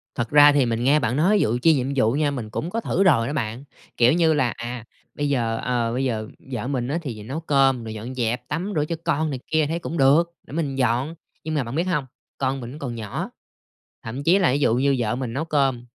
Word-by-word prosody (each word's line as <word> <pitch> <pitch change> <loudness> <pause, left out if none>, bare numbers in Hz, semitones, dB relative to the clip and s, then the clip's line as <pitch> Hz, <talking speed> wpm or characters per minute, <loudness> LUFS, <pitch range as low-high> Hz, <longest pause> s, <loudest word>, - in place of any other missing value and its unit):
Thật 120 -1 -2
ra 145 0 +8
thì 140 -2 +3
mình 115 0 -1
nghe 140 +4 +4
bạn 125 -2 -1
nói 190 +7 +4
vụ 115 +3 +1
chia 165 +4 +6
nhiệm 130 -3 0
vụ 125 -4 +3
nha, 145 +2 +1
mình 120 -6 -5
cũng 155 +9 -4
có 230 +5 -2
thử 195 - +1
rồi 130 -12 +4
đó 140 - -3
bạn. 120 -3 -3 0.3
Kiểu 120 +2 +5
như 165 -1 +3
là, 130 -5 +1
à, 120 0 -6 0.3
bây 145 0 -1
giờ, 115 -5 0
ờ, 120 -2 0
bây 130 +2 -1
giờ 110 -4 -2 0.2
vợ 120 -1 -3
mình 125 -3 -2
á, 145 - -1
thì 115 -9 -6
nấu 135 +9 -4
cơm 135 -6 +2
rồi 110 -1 -6
dọn 115 +4 -7
dẹp, 120 0 -2
tắm 175 +9 -3
rửa 150 -1 +1
cho 165 - -3
con 155 +2 +1
này 135 -3 -4
kia 155 -1 +2
thấy 165 +3 -2
cũng 170 0 -5
được, 140 +4 +5 0.2
để - - -11
mình 150 -4 -2
dọn. 130 +4 0 0.3
Nhưng 160 - -3
mà 145 - +1
bạn 120 +2 -6
biết 165 - +1
hông? 150 -6 0 0.3
Con 135 0 -1
mình 125 +4 -8
còn 125 -5 -4
nhỏ, 110 -3 -4 0.7
thậm 125 +5 -5
chí 175 +6 +4
là 180 -8 +3
ví 140 - +1
dụ 120 -5 +3
như 135 +2 +2
vợ 120 0 0
mình 125 -2 -4
nấu 145 +5 -2
cơm 135 -6 0
135 Hz, 255 wpm, -23 LUFS, 120-150 Hz, 0.7 s, ra